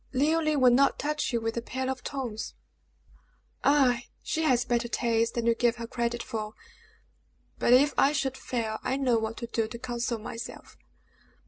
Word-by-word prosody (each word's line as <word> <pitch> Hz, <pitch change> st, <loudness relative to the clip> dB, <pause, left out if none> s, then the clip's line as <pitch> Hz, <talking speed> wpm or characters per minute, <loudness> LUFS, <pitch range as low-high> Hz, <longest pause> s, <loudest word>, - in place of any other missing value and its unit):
Leoline 310 Hz, +2 st, +2 dB
would 250 Hz, -1 st, +7 dB
not 275 Hz, +2 st, +4 dB
touch 300 Hz, 0 st, -1 dB
you 235 Hz, -, +1 dB
with 225 Hz, 0 st, -3 dB
a -, -, 0 dB
pair 260 Hz, +2 st, -4 dB
of 260 Hz, -1 st, -3 dB
tongs!" 245 Hz, -6 st, -4 dB, 1.1 s
"Ah! 265 Hz, -4 st, +4 dB, 0.2 s
she 320 Hz, -, -1 dB
has 255 Hz, -6 st, +3 dB
better 240 Hz, 0 st, 0 dB
taste 230 Hz, -1 st, 0 dB
than 235 Hz, -1 st, -1 dB
you 235 Hz, -, +4 dB
give 235 Hz, 0 st, +2 dB
her 235 Hz, -1 st, -6 dB
credit 235 Hz, 0 st, -2 dB
for; 215 Hz, -1 st, -5 dB, 1.0 s
but -, -, +2 dB
if 275 Hz, +4 st, +6 dB
I 275 Hz, -, +5 dB
should 275 Hz, -3 st, -1 dB
fail, 225 Hz, -4 st, -3 dB
I 265 Hz, -, -1 dB
know 250 Hz, -4 st, +2 dB
what 220 Hz, +1 st, -4 dB
to 235 Hz, -, -4 dB
do 230 Hz, -1 st, -1 dB
to 235 Hz, -, -7 dB
console 240 Hz, 0 st, -2 dB
myself." 225 Hz, +1 st, -8 dB
240 Hz, 180 wpm, -28 LUFS, 230-265 Hz, 1.1 s, would